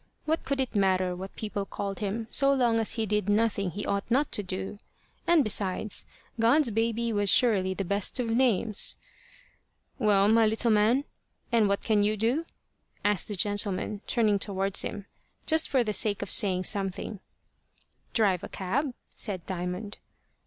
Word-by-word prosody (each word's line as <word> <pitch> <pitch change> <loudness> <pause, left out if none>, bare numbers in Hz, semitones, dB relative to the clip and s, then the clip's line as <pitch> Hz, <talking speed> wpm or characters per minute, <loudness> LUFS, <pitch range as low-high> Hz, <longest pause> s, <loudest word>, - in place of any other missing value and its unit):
What 315 +1 0
could 275 +1 -2
it 260 -2 -2
matter 185 -3 +1
what 190 +2 -8
people 210 -2 -4
called 195 0 -5
him, 215 +2 -3
so 275 -1 +4
long 240 -4 +2
as 225 - -1
he 225 - -1
did 210 -1 -1
nothing 205 -2 +1
he 200 +4 -6
ought 200 +2 -2
not 275 +5 +1
to - - -1
do? 190 +1 -5 0.5
And, 335 -4 +5
besides, 205 -1 -1 0.3
God's 235 +3 +4
baby 230 +1 0
was 205 -1 +2
surely 190 -6 +3
the 195 - -3
best 200 +6 +1
of 245 - -1
names! 225 -3 +1 1.0
"Well, 200 -2 +3
my 225 +1 +4
little 225 +2 +1
man, 220 +6 +3 0.5
and 225 -4 +3
what 200 - -1
can 215 -2 +2
you 210 +1 +1
do?" 250 +10 0 0.6
asked 205 -2 +1
the 210 - -3
gentleman, 205 +1 0
turning 215 -4 +2
towards 195 0 +1
him 205 -2 -5 0.4
just 320 0 +3
for 260 -3 +2
the 215 -2 -2
sake 205 -1 +2
of - - -3
saying 185 -3 +3
something. 195 0 -1 0.9
"Drive 195 -6 +1
a - - -6
cab," 245 +8 -2 0.2
said 190 -6 -5
Diamond. 180 +3 -5
210 Hz, 165 wpm, -28 LUFS, 195-230 Hz, 1.0 s, And